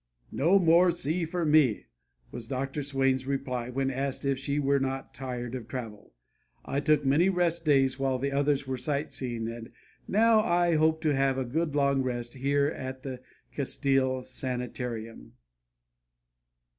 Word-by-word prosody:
"No 170 +7 +3
more 175 0 +5
sea 170 0 0
for 170 +1 -2
me!" 150 -8 +3 0.5
was 115 -2 -7
Dr. 135 +2 -3
Swain's 135 -2 0
reply 130 -3 -2
when 135 +1 -1
asked 135 +1 -3
if 135 -1 0
she 140 +1 -2
were 140 -1 +2
not 135 0 -3
tired 125 -2 -5
of 125 -4 -6
travel. 115 - -7 0.5
"I 140 - -1
took 150 -1 +2
many 155 +8 +4
rest 170 -2 0
days 135 -3 +3
while 135 -1 +1
the 140 +2 -2
others 140 0 +1
were 130 -1 -3
sight 140 +4 -2
seeing, 120 -3 -4
and 115 0 -7 0.4
now 225 +2 +4
I 175 -3 +2
hope 160 0 +2
to 155 -2 +2
have 135 -1 +1
a 130 - -1
good 150 +4 -2
long 140 -1 +2
rest 120 -2 -3
here 140 +2 +1
at 130 -3 -5
the 130 -3 -6 0.3
Castile 135 -2 +1
Sanitarium." 125 - -5
135 Hz, 155 wpm, -28 LUFS, 130-150 Hz, 0.5 s, more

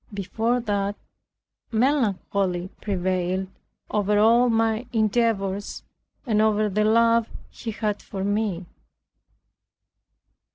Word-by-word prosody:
Before 225 +5 -1
that, 205 -2 -1 0.8
melancholy 200 -7 0
prevailed 185 -1 -1 0.4
over 210 0 +1
all 235 +4 +5
my 225 +1 +1
endeavors, 215 -3 0 0.4
and 215 -4 +2
over 215 -1 +2
the 210 +2 +1
love 230 +1 +3 0.2
he 230 - -7
had 210 -1 -2
for 195 -2 -6
me. 205 -3 -1
210 Hz, 90 wpm, -24 LUFS, 195-225 Hz, 0.8 s, all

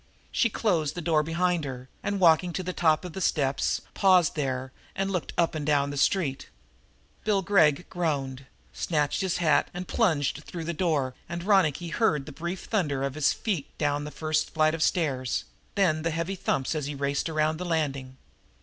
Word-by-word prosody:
She 235 - +2
closed 170 -10 0
the - - -4
door 155 -1 +2
behind 170 +2 0
her 130 -2 -6
and, 205 -1 -2
walking 175 0 +4
to 185 - -3
the 185 0 -3
top 160 0 +2
of 175 - -7
the 190 - -5
steps, 140 -5 +1
paused 185 -4 +4
there 130 -3 -2 0.2
and 195 0 -1
looked 180 -3 -2
up 170 -1 +2
and 155 -2 -3
down 145 -1 +2
the - - -5
street. 140 -1 0 0.7
Bill 200 -3 +1
Gregg 170 -4 +4
groaned, 140 -6 -2 0.3
snatched 150 -1 0
his 190 -2 0
hat 155 -4 +3
and 180 0 -5
plunged 160 - +1
through 170 -2 -6
the 170 +1 -3
door, 150 -7 0 0.2
and 175 0 -4
Ronicky 175 -5 +2
heard 150 -6 +1
the - - -8
brief 170 +2 -5
thunder 145 -11 -1
of 135 -1 -1
his 155 0 +2
feet 185 -11 -2
down 145 -1 0
the - - -5
first 155 +1 -1
flight 155 0 +3
of 165 - -3
stairs, 135 -8 0 0.3
then 170 -6 +2
the 165 - 0
heavy 165 +4 -2
thumps, 140 -7 -1
as 150 -3 -2
he 145 - -4
raced 140 +3 -1
around 155 0 +1
the 180 - -4
landing. 140 -6 -2
160 Hz, 190 wpm, -27 LUFS, 145-180 Hz, 0.7 s, walking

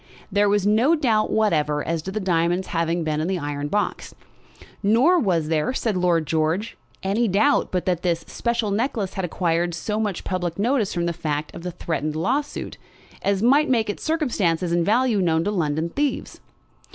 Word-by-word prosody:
There 205 +1 +3
was 205 -1 +2
no 230 +10 +4
doubt 225 -8 +1
whatever 150 -9 +1
as 165 0 -1
to 190 - -6
the 215 - -2
diamonds 175 -1 0
having 165 0 0
been 155 -1 -1
in 160 - -1
the 190 0 0
iron 145 -2 -3
box; 205 +6 -2 0.7
nor 250 - +4
was 175 - +1
there, 160 +10 0
said 220 -6 -1
Lord 175 -3 +2
George, 160 +8 -1 0.3
any 210 +5 +1
doubt 215 +9 +2
but 180 -1 -1
that 180 -2 0
this 170 -2 0
special 235 -3 -1
necklace 215 -3 -1
had 190 - -3
acquired 170 0 0
so 210 +6 -3
much 210 -4 -2
public 175 -2 -3
notice 225 0 +1
from 170 -1 -1
the 170 - -1
fact 155 -3 -3
of - - -8
the 180 - -4
threatened 155 -3 -3
lawsuit, 260 - -2 0.4
as 200 0 0
might 285 +6 +4
make 225 -5 +2
its - - -10
circumstances 200 - 0
and 170 0 +2
value 230 -1 +2
known 165 -2 +2
to 205 - -1
London 160 -3 -1
thieves. 290 -1 -2
185 Hz, 185 wpm, -23 LUFS, 165-220 Hz, 0.7 s, no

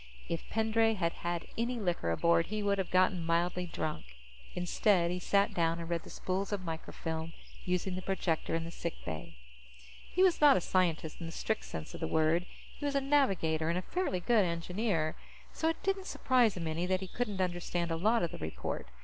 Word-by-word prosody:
If 165 - -4
Pendray 225 0 +2
had 170 -4 0
had 175 0 -3
any 240 +1 0
liquor 175 - 0
aboard, 165 - +3
he 215 0 -2
would 200 -1 +2
have 190 - -1
gotten 185 -1 +3
mildly 175 +2 +1
drunk. 155 -2 -3 0.5
Instead, 180 0 +2
he 180 - -2
sat 200 +2 +2
down 165 -1 +1
and 170 -1 -5
read 170 -1 -1
the - - -13
spools 190 +2 -2
of 200 -2 -2
microfilm, 160 -1 -4 0.3
using 180 +1 0
the 185 - -3
projector 180 -4 -1
in 165 - -1
the 165 - -6
sick 170 -1 -4
bay. 80 -1 -6 0.7
He 365 - +3
was 365 -4 +4
not 290 -2 +8
a - - 0
scientist 165 -4 0
in 170 - -5
the - - -6
strict 220 +5 -2
sense 80 -1 -6
of - - -7
the - - -1
word. 160 +3 +2 0.3
He - - -8
was 285 -1 0
a - - +5
navigator 195 - +2
and 170 - +1
a 185 - -2
fairly 360 - -1
good 220 +2 +4
engineer. 170 -1 -1 0.4
So 320 - +1
it 325 - -3
didn't 390 0 0
surprise 245 -7 +3
him 170 - -3
any 165 +3 -1
that 185 0 +1
he 190 - -4
couldn't 210 -1 -3
understand 175 -1 -1
a - - +1
lot 215 +7 +2
of 170 - -1
the - - -7
report. 80 -4 -4
180 Hz, 210 wpm, -32 LUFS, 165-210 Hz, 0.7 s, not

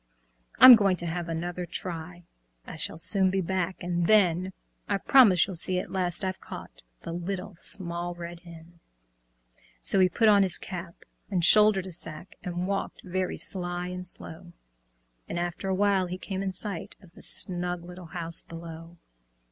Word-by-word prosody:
"I'm 255 0 +11
going 200 -4 +2
to 175 - -1
have 170 0 -4
another 175 +2 -4
try, 175 0 -7 0.4
I - - -9
shall 160 - -4
soon 190 +3 +4
be 190 +1 0
back, 185 0 -2
and 175 -1 -1
then 185 -3 +3 0.4
I 200 - +1
promise 195 -5 +5
you'll 190 - -7
see 185 +2 +2
at 180 - -4
last 180 -1 0
I've 190 0 -4
caught - - -10 0.2
The - - -7
Little 185 +3 -5
Small 175 -1 0
Red 170 0 -8
Hen." 170 -1 -15 1.0
So 125 - +1
he 185 -1 +5
put 225 +5 +2
on 205 -2 +6
his 190 -3 +2
cap 175 -2 -9 0.2
and 180 -4 +1
shouldered 210 -2 +6
a 185 - -9
sack, 155 +2 -6
And 175 0 -3
walked 195 +1 -4
very 185 0 -3
sly 175 -1 -3
and 180 0 -6
slow; 170 0 -10 0.8
And - - -4
after 175 +2 -3
a 190 - +1
while 195 -1 +2
he 180 +1 -5
came 190 0 -5
in 195 -1 -2
sight 185 -1 -5
Of 185 -4 -19
the - - -16
snug 175 -1 0
little 180 0 -10
house 165 0 -4
below. 165 0 -10
180 Hz, 170 wpm, -27 LUFS, 170-190 Hz, 1.0 s, I'm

